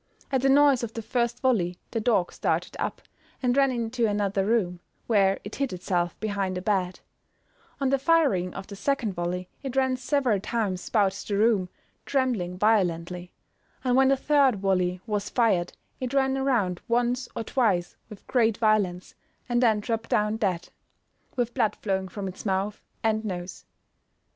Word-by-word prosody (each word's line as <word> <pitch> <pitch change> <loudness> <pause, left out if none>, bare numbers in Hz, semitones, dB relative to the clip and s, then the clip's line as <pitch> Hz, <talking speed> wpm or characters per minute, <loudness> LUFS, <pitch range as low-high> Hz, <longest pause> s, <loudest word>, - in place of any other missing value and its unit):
At 265 -2 +2
the 270 - +3
noise 280 -2 +5
of 230 -2 -5
the 225 - -4
first 240 +1 -1
volley 185 -9 +1
the 230 - -1
dog 210 -6 +1
started - - -1
up, - - -3 0.4
and 245 0 +2
ran 275 -1 +4
into 235 -1 0
another 205 -2 0
room, 190 -6 +1 0.3
where 195 -4 +3
it 205 - -7
hid 275 -4 -1
itself 175 -1 -1
behind 200 -3 -2
a - - -3
bed; 190 -3 0 0.8
on 270 -1 +1
the 275 - +3
firing 270 - +2
of 195 - -6
the 200 - -9
second 235 -2 -1
volley, 180 +1 -3
it 270 -2 -5
ran 260 -1 +2
several 255 -4 +1
times 200 -3 -2
bout 205 -4 +3 0.2
the 200 - 0
room, 210 -4 +3 0.3
trembling 235 -10 -1
violently; 180 -4 +1 0.5
and 250 -1 +2
when 265 0 +5
the 270 0 +4
third 280 -3 +3
volley 185 -2 0
was 210 -2 -2
fired 200 -8 +1 0.3
it 255 +1 -3
ran 265 -1 +2
around 235 -10 0
once 245 +1 0
or - - -2
twice 205 -8 0
with 210 -3 -12
great 230 -4 +2
violence, 205 -5 +1 0.3
and 240 -1 +1
then 220 -4 +4
dropped 230 +1 -3
down 210 +1 +2
dead, 190 -6 -1 0.7
with 240 -2 -1
blood 220 -5 +1
flowing 190 -2 -2
from 195 +1 -5
its 185 0 -8
mouth 195 +1 -1 0.2
and 220 0 +1
nose. 180 -3 -6
215 Hz, 165 wpm, -26 LUFS, 190-250 Hz, 0.8 s, noise